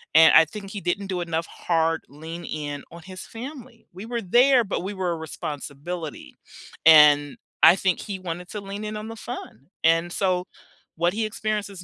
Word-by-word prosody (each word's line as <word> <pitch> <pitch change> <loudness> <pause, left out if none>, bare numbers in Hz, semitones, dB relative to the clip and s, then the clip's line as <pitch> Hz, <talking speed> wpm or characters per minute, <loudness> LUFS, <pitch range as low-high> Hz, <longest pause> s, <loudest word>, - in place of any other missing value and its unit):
And 160 0 +8
I 160 - +8
think 195 +3 -9
he 205 - -6
didn't 195 +3 -2
do 180 -2 -2
enough 165 -1 -2
hard 165 -1 0
lean-in 150 -1 -6
on 170 0 -11
his 185 0 -9
family. 250 -1 -10
We 190 +4 -9
were 235 -1 -3
there, 245 +6 +4
but 195 -3 -3
we 200 +2 -4
were 185 -2 -2
a 165 - -2
responsibility. 155 +1 -7 0.5
And 150 -2 +7 0.3
I 175 - +9
think 190 -2 0
he 195 -2 -6
wanted 180 0 -6
to 210 - -5
lean 200 +2 -7
in 215 0 -4
on 215 +1 -6
the 225 - -7
fun. 190 - -9 0.2
And 165 +1 +3
so 185 -2 0 0.5
what 175 +2 +1
he 220 0 -1
experiences 210 -3 -4
180 Hz, 185 wpm, -24 LUFS, 165-210 Hz, 0.5 s, I